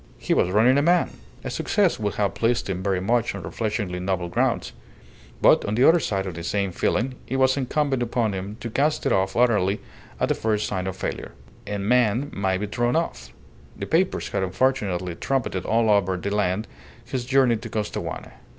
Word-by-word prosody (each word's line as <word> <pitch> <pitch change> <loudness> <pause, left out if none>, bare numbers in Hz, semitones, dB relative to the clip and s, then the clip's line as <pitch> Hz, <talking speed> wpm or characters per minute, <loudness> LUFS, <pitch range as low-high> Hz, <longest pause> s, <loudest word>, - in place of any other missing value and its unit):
He - - -1
was 90 - +2
running 115 +8 +4
a - - +3
man! 175 +4 +3 0.3
A - - -4
success 200 - +1
would 105 -2 -2
have 100 -2 0
pleased 115 +1 0
him 95 -2 -3
very 95 -1 0
much 115 +3 0
on 95 - -7
refreshingly 105 0 -3
novel 90 -1 -2
grounds; 85 - 0 0.7
but, - - +6
on 105 - -2
the 125 +4 +5
other 170 +2 +6
side 95 -9 -1
of 95 - -4
the 85 - -7
same 100 +2 -1
feeling, 120 +8 0
it 135 - -3
was 130 0 +3
incumbent 140 0 0
upon 115 -2 0
him 95 +3 -5
to 115 - -5
cast 150 +6 +1
it - - +2
off 95 0 +1
utterly 105 -5 +3 0.4
at - - +2
the - - +4
first 105 -1 -1
sign 95 -2 -3
of 95 - -3
failure. - - -4 0.3
A 105 0 -2
man 120 +5 +2
may 95 -1 0
be 105 - -3
thrown 120 +5 0
off. 160 - -2 0.5
The - - -4
papers - - 0
had - - -1
unfortunately 95 -3 0
trumpeted 115 -3 -2
all 115 0 +2
over 95 -3 +2
the 100 +3 -3
land 105 +1 0 0.4
his 125 +1 -3
journey 130 -2 +3
to 115 +1 -8
Costaguana. 105 -1 -4
105 Hz, 195 wpm, -24 LUFS, 95-125 Hz, 0.7 s, but